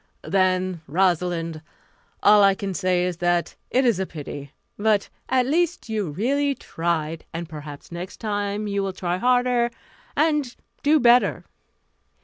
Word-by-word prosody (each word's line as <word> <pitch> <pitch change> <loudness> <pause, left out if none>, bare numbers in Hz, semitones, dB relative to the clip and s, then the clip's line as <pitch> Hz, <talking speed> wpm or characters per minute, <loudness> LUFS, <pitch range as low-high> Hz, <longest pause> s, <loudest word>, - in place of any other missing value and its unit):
"Then, 185 -2 +1
Rosalind, 170 -1 0 0.6
all 210 0 +7
I 195 -1 +5
can 195 -1 -4
say 180 -1 +1
is 180 -2 -2
that 175 0 0
it 260 +1 +2
is 230 -6 +3
a 190 - -1
pity. 145 -2 -8 0.2
But 210 -1 +1 0.2
at 255 -1 +3
least 335 0 0
you 210 -6 -1
really 275 - 0
tried, 165 -4 -2
and 170 0 -4
perhaps 150 -2 -9
next 175 +2 -6
time 205 -1 -2
you 200 -1 -1
will 195 -1 -2
try 180 -1 -2
harder 245 +1 +2 0.5
and 300 -4 +1 0.3
do 300 +2 +4
better." 245 -1 +4
195 Hz, 140 wpm, -24 LUFS, 175-240 Hz, 0.6 s, all